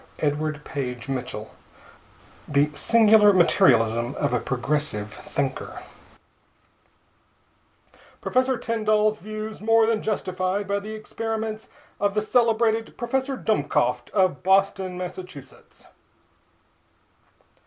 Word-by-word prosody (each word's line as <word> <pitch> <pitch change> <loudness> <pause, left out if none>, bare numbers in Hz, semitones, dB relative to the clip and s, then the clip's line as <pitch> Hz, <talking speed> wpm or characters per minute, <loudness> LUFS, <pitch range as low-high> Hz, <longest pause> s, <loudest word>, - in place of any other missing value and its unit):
THE 150 - +1
SOUL 150 0 -4
SPECTROSCOPE 125 -4 -5 1.0
The 145 +1 +2
Singular 220 +3 +5
Materialism 120 -8 +3
of 145 -4 -1
a 125 - +2
Progressive 130 -5 -2
Thinker 135 +3 -4 2.4
PROFESSOR 255 0 +1
TYNDALL'S 215 -2 +1
VIEWS 215 +2 -7
MORE 225 +1 +4
THAN 220 -1 0
JUSTIFIED 185 -1 -2
BY 200 +1 -1
THE 215 +2 -7
EXPERIMENTS 220 0 -5 0.3
OF 205 0 0
THE 210 - +2
CELEBRATED 225 -1 +1
PROFESSOR 265 +2 -2
DUMMKOPT 125 - 0
OF 185 -9 +1
BOSTON, 190 -1 +1
MASS. 180 -4 -9
195 Hz, 90 wpm, -24 LUFS, 145-220 Hz, 2.4 s, Singular